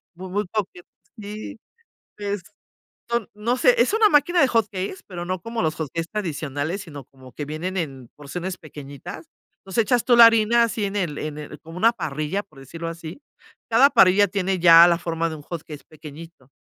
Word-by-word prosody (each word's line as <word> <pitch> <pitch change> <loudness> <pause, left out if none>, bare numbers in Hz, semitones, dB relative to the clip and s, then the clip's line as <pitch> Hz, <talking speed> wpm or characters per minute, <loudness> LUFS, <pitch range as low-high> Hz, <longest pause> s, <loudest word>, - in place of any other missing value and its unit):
Muy, 185 +2 -8
muy 205 +3 -1
coqueto 190 -4 -4 0.3
sí, 210 +1 -8 0.6
y 205 - -9
es 200 -2 -3 0.7
son 235 -3 -1
no 225 +4 -1
sé, - - +4
es - - +3
una 440 -1 +5
máquina 340 +4 +3
de 270 - +5
hot 230 -3 +2
cakes, 190 -1 -4
pero 175 -3 -6
no 185 +1 -3
como 230 +2 -4
los 155 -2 -1
hot 160 -2 -4
cakes 165 0 -3
tradicionales, 160 -2 -3
sino 145 -7 -10
como 130 0 -17
que 150 - -5
vienen 165 +6 -4
en 135 -8 -5
porciones 175 +6 -6
pequeñitas, 145 +1 -10 0.3
entonces, 195 +4 0
echas 240 +2 +1
tú 245 - +4
la 235 -1 +11
harina 230 +1 +4
así 225 -2 -2
en 200 +1 -3
el 170 -7 -2
en 150 -1 -5
el 150 - -9
como 165 +1 -12
una 230 +5 +4
parrilla, 155 -1 -3
por 155 -9 -21
decirlo 165 +5 -7
así, 165 - -8 0.5
cada 255 +5 +6
parrilla 190 -1 +5
tiene 190 0 -1
ya 170 -1 +8
la 170 -1 +2
forma 165 -1 -2
de 160 - -6
un 150 - -12
hot 165 +1 -7
cake 150 -3 -11
pequeñito. 155 -2 -13
180 Hz, 200 wpm, -23 LUFS, 155-210 Hz, 0.7 s, la